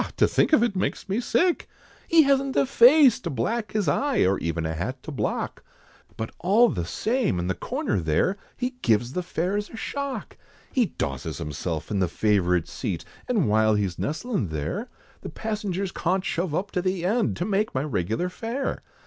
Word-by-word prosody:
To - - +5
think - - +2
of 270 -7 +5
it, 235 -5 0
makes 185 - -2
me 200 +4 0
sick 345 +8 +1 0.4
He 330 -1 +6
hasn't 275 -1 +2
a - - +4
face, 265 +2 +6
to 170 - -4
black 215 - -2
his 210 -5 0
eye, 270 - +2
Or 95 +1 +2
even 85 0 -2
a 80 - -1
hat 125 - -4
to 155 - -6
block, 140 - -3 0.5
But 110 - -4
all 210 +7 +5
the 85 -4 -2
same, 225 - 0
in 85 - -1
the 95 - 0
corner 95 - -2
there, 80 - +1 0.2
He 250 0 -1
gives 120 +3 +2
the 180 - -1
fares 185 +4 -2
a - - -10
shock! 280 +3 -4 0.3
He 245 -5 +2
dosses 65 - -4
himself 80 +3 -4
in 100 - 0
the 95 - +2
favourite 90 -3 +1
seat, - - -4 0.2
And 215 - +2
while 110 0 +3
he's 100 -4 -1
nestlin' 165 - -2
there, 75 -2 -3 0.3
The - - -6
passengers 200 -4 -3
cawnt 185 +2 0
shove 170 -4 -1
up 200 +4 -2
to 180 - 0
the 185 -1 -1
end, 220 +4 +1
To 175 - -1
make 210 -2 0
my 130 - +1
regular 115 - -1
fare. 235 +8 -3
180 Hz, 190 wpm, -25 LUFS, -, 0.5 s, He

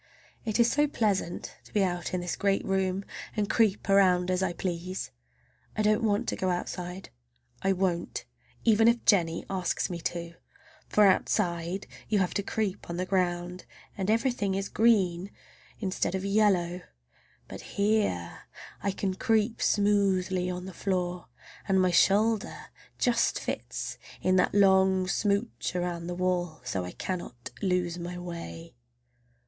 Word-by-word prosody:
It 220 0 -1
is 235 0 +5
so 295 +1 +3
pleasant 205 -9 -1
to - - -18
be 205 - +2
out 175 -2 -2
in 180 - -1
this 175 -1 -2
great 195 -1 +1
room 190 0 0 0.3
and 210 -1 +1
creep 215 -3 +2
around 185 -2 +4
as 185 0 +1
I 190 -2 +1
please! 180 - -4 0.7
I 215 - +2
don't 215 +2 +3
want 220 +1 +1
to - - -1
go 185 - -1
outside. 180 +1 -4 0.5
I 195 0 +2
won't, 180 -2 -1 0.4
even 225 0 +5
if 235 0 +3
Jennie 170 -5 +3
asks 185 -1 -1
me 175 - -4
to. 170 0 -4 0.6
For 210 - +5
outside 185 -1 +1 0.2
you 215 - +2
have 185 -2 +1
to - - 0
creep 200 -2 -3
on 170 - -3
the 185 - -1
ground, 180 -1 -1 0.3
and 190 0 -2
everything 225 -4 +1
is 195 +1 -2
green 195 -5 +2 0.5
instead 190 -2 -1
of 190 0 -3
yellow. 190 -4 +2 0.7
But - - -8 0.2
here 200 - 0 0.4
I 200 - 0
can 195 0 -1
creep 220 +3 +1
smoothly 190 -3 +2
on 180 0 -4
the 190 - -8
floor, 180 -2 -2 0.4
and 190 -1 +3
my 185 -1 +3
shoulder 210 +4 +2 0.3
just 235 -2 +2
fits - - -4 0.2
in 185 - +2
that 180 - +2
long 190 -1 +4
smooch 200 0 -1
around 175 -1 -2
the 175 - -3
wall, 180 -2 -1
so 95 -7 -2
I 90 - -6
cannot 150 - -5
lose 180 -3 0
my 175 +1 -5
way. 170 -1 -7
190 Hz, 150 wpm, -28 LUFS, 180-205 Hz, 0.7 s, is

